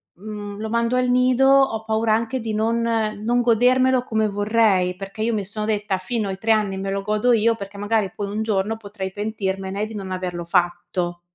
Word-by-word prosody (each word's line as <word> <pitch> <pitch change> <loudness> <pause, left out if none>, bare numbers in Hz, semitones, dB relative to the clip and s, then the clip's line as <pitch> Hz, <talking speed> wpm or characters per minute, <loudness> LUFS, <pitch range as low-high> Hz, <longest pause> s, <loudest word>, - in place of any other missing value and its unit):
mhmm, 205 +1 -7
lo 220 - -3
mando 235 +2 +1
al 250 0 +2
nido, 250 +1 +4
ho 270 -5 +4
paura 220 0 +1
anche 230 +3 -2
di 225 -1 -4
non 230 +2 +1
non 230 +1 0
godermelo 250 +2 +3
come 220 -3 0
vorrei, 205 -3 +2
perché 195 +3 -8
io 230 +1 +1
mi 200 -2 -2
sono 210 +2 -4
detta 210 -2 0
fino 215 +1 -2
ai 190 0 -5
3 225 - -4
anni 205 -3 +1
me 195 0 -3
lo 195 0 -2
godo 215 +4 +2
io, 230 +1 +3
perché 200 -1 -9
magari 205 -1 0
poi 200 -1 -4
un 215 +1 -2
giorno 215 0 0
potrei 200 -3 -6
pentirmene 200 -1 -3
di 220 - -9
non 195 -2 -5
averlo 180 -2 -3
fatto. 175 0 -1
215 Hz, 200 wpm, -22 LUFS, 195-230 Hz, -, nido